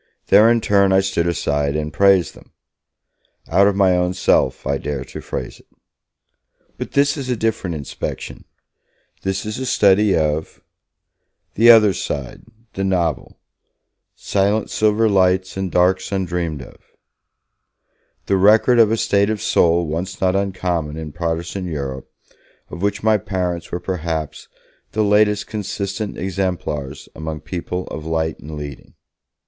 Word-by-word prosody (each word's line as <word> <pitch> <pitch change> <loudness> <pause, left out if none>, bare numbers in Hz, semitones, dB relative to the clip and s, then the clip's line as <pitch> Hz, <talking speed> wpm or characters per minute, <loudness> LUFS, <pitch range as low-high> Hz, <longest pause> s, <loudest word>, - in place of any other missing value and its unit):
There, 110 +2 +7
in 120 -1 +2
turn, 100 -2 +3
I 95 0 +5
stood 95 -3 -1
aside 70 -4 -1
and 75 -1 -3
praised 95 -1 +3
them! - - -18 0.9
Out 95 +4 +4
of 100 - +1
my 95 -2 +3
own 90 0 0
self, 65 -7 +1
I 70 0 -1
dare 70 -3 -4
to 65 - -9
phrase - - -6
it. - - -23 1.1
But - - -6
this 140 +2 +2
is 135 -2 -5
a 125 - +1
different 105 -6 -2
inspection, 70 -3 -6 0.8
this 95 0 -2
is 105 +3 -4
a 130 - -3
study 100 -2 +4
of 75 0 -1 0.9
the 115 +3 +5
other 110 -4 +7
side, 70 -6 -5 0.3
the 95 - -3
novel 85 -6 -1 0.8
Silent 100 +2 0
silver 110 +1 +2
lights 95 -2 +2
and 95 -2 -3
darks 95 +2 +2
undreamed 90 -6 -2
of, - - -15 1.5
the 100 - +1
record 110 +5 +5
of 110 -2 +5
a 115 - +1
state 100 -1 +2
of 110 -1 -1
soul 85 -2 +2
once 85 +4 -4
not 95 0 +1
uncommon 90 -6 -2
in 80 -2 -6
Protestant 85 +3 -3
Europe, 70 -5 -5 0.6
of 85 - -7
which 100 +1 -1
my 110 -1 +3
parents 90 -3 -3
were 90 - -2
perhaps 80 -4 -4 0.5
the 110 - +1
latest 105 0 +3
consistent 100 0 -4
exemplars 90 -7 -3
among 80 -1 -6
people 90 +1 -5
of 80 - -6
light 80 0 -2
and 75 0 -8
leading. 70 -3 -9
95 Hz, 145 wpm, -20 LUFS, 80-100 Hz, 1.5 s, There